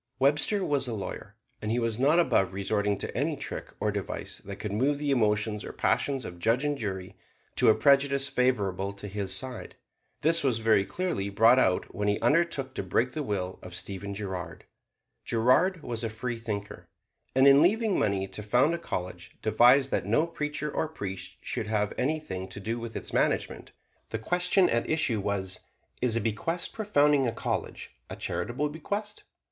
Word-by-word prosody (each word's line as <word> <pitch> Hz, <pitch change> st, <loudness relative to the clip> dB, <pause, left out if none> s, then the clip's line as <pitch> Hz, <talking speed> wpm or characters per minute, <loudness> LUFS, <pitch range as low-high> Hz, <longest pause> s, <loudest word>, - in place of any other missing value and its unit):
Webster 145 Hz, +9 st, +2 dB
was 140 Hz, -3 st, +1 dB
a 120 Hz, -, -3 dB
lawyer; 100 Hz, -, -6 dB, 0.3 s
and 105 Hz, -, -3 dB
he 115 Hz, -, +1 dB
was 115 Hz, -1 st, -1 dB
not 145 Hz, +5 st, +4 dB
above 95 Hz, -, +2 dB
resorting 100 Hz, +1 st, 0 dB
to -, -, -6 dB
any -, -, 0 dB
trick -, -, -6 dB
or -, -, 0 dB
device -, -, -5 dB
that 100 Hz, 0 st, -7 dB
could 105 Hz, +1 st, -5 dB
move 135 Hz, +8 st, +1 dB
the 145 Hz, -1 st, -1 dB
emotions 105 Hz, -3 st, +1 dB
or -, -, -6 dB
passions 135 Hz, -2 st, 0 dB
of 90 Hz, -1 st, -8 dB
judge 115 Hz, +9 st, +2 dB
and 145 Hz, 0 st, +1 dB
jury 95 Hz, -7 st, -5 dB, 0.4 s
to -, -, +5 dB
a 110 Hz, -, +6 dB
prejudice 140 Hz, -1 st, +3 dB
favorable 100 Hz, -8 st, 0 dB
to 100 Hz, +1 st, -8 dB
his 100 Hz, -1 st, -3 dB
side. 130 Hz, -3 st, -3 dB, 0.5 s
This 165 Hz, 0 st, +4 dB
was 130 Hz, -5 st, +2 dB
very 110 Hz, -3 st, +3 dB
clearly 175 Hz, -, -2 dB
brought 115 Hz, +5 st, +5 dB
out 95 Hz, -7 st, +1 dB
when 105 Hz, +1 st, -2 dB
he 105 Hz, 0 st, +1 dB
undertook 150 Hz, -4 st, +1 dB
to -, -, -3 dB
break 115 Hz, +6 st, 0 dB
the 155 Hz, -, -3 dB
will 95 Hz, -7 st, -3 dB
of 90 Hz, -1 st, -9 dB
Stephen 100 Hz, +1 st, -5 dB
Girard. 95 Hz, -4 st, -6 dB, 0.6 s
Girard 150 Hz, +10 st, +2 dB
was 115 Hz, -1 st, -3 dB
a 115 Hz, -, -1 dB
freethinker, 110 Hz, -3 st, -5 dB, 0.5 s
and 130 Hz, +1 st, +6 dB
in 140 Hz, +1 st, +8 dB
leaving 215 Hz, +4 st, +3 dB
money 95 Hz, -1 st, 0 dB
to 95 Hz, +2 st, -7 dB
found 125 Hz, +9 st, +3 dB
a 170 Hz, -, -2 dB
college 90 Hz, -, -6 dB
devised 125 Hz, +5 st, +5 dB
that -, -, 0 dB
no 155 Hz, -, +3 dB
preacher 150 Hz, -2 st, -3 dB
or 160 Hz, -, 0 dB
priest 100 Hz, -11 st, -6 dB
should 110 Hz, -, -3 dB
have 105 Hz, -1 st, 0 dB
anything 130 Hz, -11 st, -2 dB
to 95 Hz, +2 st, -9 dB
do 115 Hz, +4 st, -3 dB
with 115 Hz, -1 st, -7 dB
its -, -, -5 dB
management. -, -, 0 dB, 0.4 s
The 115 Hz, -, -2 dB
question 180 Hz, -, +2 dB
at 115 Hz, 0 st, 0 dB
issue 145 Hz, -8 st, +1 dB
was, 95 Hz, -2 st, -2 dB, 0.4 s
"Is 120 Hz, -3 st, +2 dB
a 115 Hz, -, +1 dB
bequest 140 Hz, +12 st, -2 dB
for 220 Hz, -, -4 dB
founding 145 Hz, -7 st, +4 dB
a -, -, 0 dB
college -, -, -4 dB, 0.2 s
a -, -, -5 dB
charitable 140 Hz, +5 st, -2 dB
bequest?" 205 Hz, +7 st, -5 dB
115 Hz, 185 wpm, -28 LUFS, 100-145 Hz, 0.6 s, in